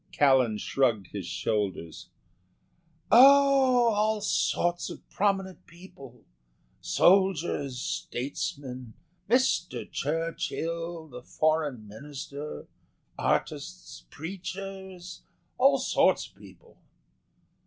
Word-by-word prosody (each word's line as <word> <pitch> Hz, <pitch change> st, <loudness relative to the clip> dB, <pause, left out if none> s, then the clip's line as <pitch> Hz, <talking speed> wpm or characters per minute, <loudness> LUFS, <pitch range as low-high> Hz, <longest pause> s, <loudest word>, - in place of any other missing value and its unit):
Callan 130 Hz, -6 st, +3 dB
shrugged 110 Hz, -4 st, 0 dB
his 100 Hz, -4 st, -6 dB
shoulders. 95 Hz, -3 st, -3 dB, 1.0 s
"Oh, 265 Hz, -1 st, +6 dB
all 215 Hz, +1 st, +1 dB
sorts 175 Hz, -4 st, 0 dB
of -, -, -11 dB
prominent 195 Hz, -2 st, -1 dB
people 155 Hz, -7 st, -14 dB, 0.5 s
soldiers, 175 Hz, -8 st, +2 dB
statesmen, 130 Hz, -2 st, -5 dB, 0.3 s
Mr. 175 Hz, -, +1 dB
Churchill, 165 Hz, +1 st, -3 dB
the 125 Hz, -4 st, -10 dB
Foreign 150 Hz, -5 st, -1 dB
Minister, 140 Hz, +5 st, -8 dB, 0.5 s
artists, -, -, -3 dB
preachers 190 Hz, -, -8 dB, 0.4 s
all 275 Hz, +2 st, +5 dB
sorts 265 Hz, -, +2 dB
of -, -, -25 dB
people." 470 Hz, -, -18 dB
165 Hz, 80 wpm, -28 LUFS, 125-195 Hz, 1.0 s, Oh